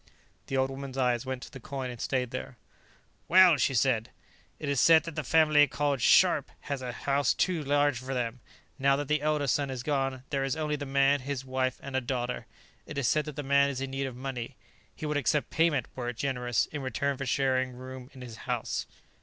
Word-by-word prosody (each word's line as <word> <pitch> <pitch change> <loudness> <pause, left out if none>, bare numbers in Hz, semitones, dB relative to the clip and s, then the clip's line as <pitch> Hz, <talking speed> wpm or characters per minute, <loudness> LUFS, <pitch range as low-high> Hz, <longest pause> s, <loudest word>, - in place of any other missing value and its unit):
The 135 - -1
old 130 0 +1
woman's 135 -1 -7
eyes 125 -1 +1
went 130 -1 -4
to - - -10
the 135 - -9
coin 130 +1 -5
and 120 - -9
stayed 125 -2 -1
there. 130 -1 -6 0.7
"Well," 180 -2 +7
she 135 +1 +1
said. 120 -1 +2 0.5
"It 150 - -6
is 140 -2 +2
said 160 -2 +7
that 165 - -6
the 155 - -2
family 155 0 +5
called 140 -1 -1
Scharpe - - +5
has 140 -2 -4
a 125 -1 -4
house 140 +2 +1
too 175 -4 0
large 145 -2 +2
for 130 +1 -5
them, 125 0 -2 0.4
now 135 0 +4
that 145 0 -3
the 150 0 +1
elder 150 -1 +1
son 140 +2 +1
is 130 -2 -5
gone; 135 -3 -1
there 135 -2 0
is 135 +2 -1
only 155 -1 -1
the 145 -1 -5
man, 140 +1 +3
his 135 0 -4
wife 130 -1 -1
and 135 -1 -6
a 130 - +2
daughter. 125 0 -3 0.4
It - - -7
is 140 -4 +1
said 155 +5 +2
that 150 -3 -7
the 145 - -4
man 140 0 +4
is 135 -2 -4
in 135 0 -4
need 135 0 -2
of 130 - -7
money; 125 -1 -5 0.4
he - - -6
would 150 -1 0
accept 145 +1 0
payment, 160 -6 +2
were 120 -2 -3
it 120 - -6
generous, 125 -3 0
in 150 - -4
return 135 +2 -1
for 135 0 -5
sharing 130 0 +1
room 130 0 -9
in 130 - -13
his 120 -3 -9
house." - - -2
135 Hz, 225 wpm, -29 LUFS, 130-145 Hz, 0.7 s, Well